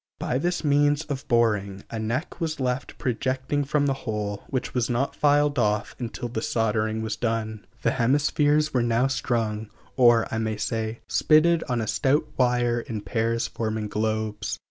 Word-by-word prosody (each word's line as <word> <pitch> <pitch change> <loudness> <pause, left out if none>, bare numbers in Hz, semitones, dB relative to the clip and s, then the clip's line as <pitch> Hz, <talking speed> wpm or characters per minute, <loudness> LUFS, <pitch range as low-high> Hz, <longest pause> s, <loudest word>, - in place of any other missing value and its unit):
By 125 - -1
this 175 +3 -1
means 145 +1 +3
of 140 -1 -5
boring, 105 -4 +1
a 115 - -3
neck 120 +11 -3
was 160 -2 -2
left 125 0 -2
projecting 130 +2 -1
from 145 +1 +1
the 140 - +2 0.2
hole, 105 -2 -3
which 130 -2 -3
was 125 -3 0
not 125 +3 0
filed 145 -1 +3
off 105 -2 0
until 120 0 -4
the 115 -1 -4
soldering 110 -1 0
was 110 -1 -2
done. 110 -2 -2 0.2
The - - +3
hemispheres 145 +4 +2
were 125 - +2
now 120 +1 +2
strung 110 -5 -1 0.3
or, 120 -3 +5
I 110 - 0
may 110 -1 -1
say, 110 0 -3
spitted 165 +2 +4
on 120 -2 0
a 110 - -3
stout 145 +3 +2
wire 120 -1 +2
in 115 -2 -5
pairs 115 +3 0
forming 110 -1 -3
globes. 110 0 -2
120 Hz, 165 wpm, -25 LUFS, 110-140 Hz, 0.3 s, or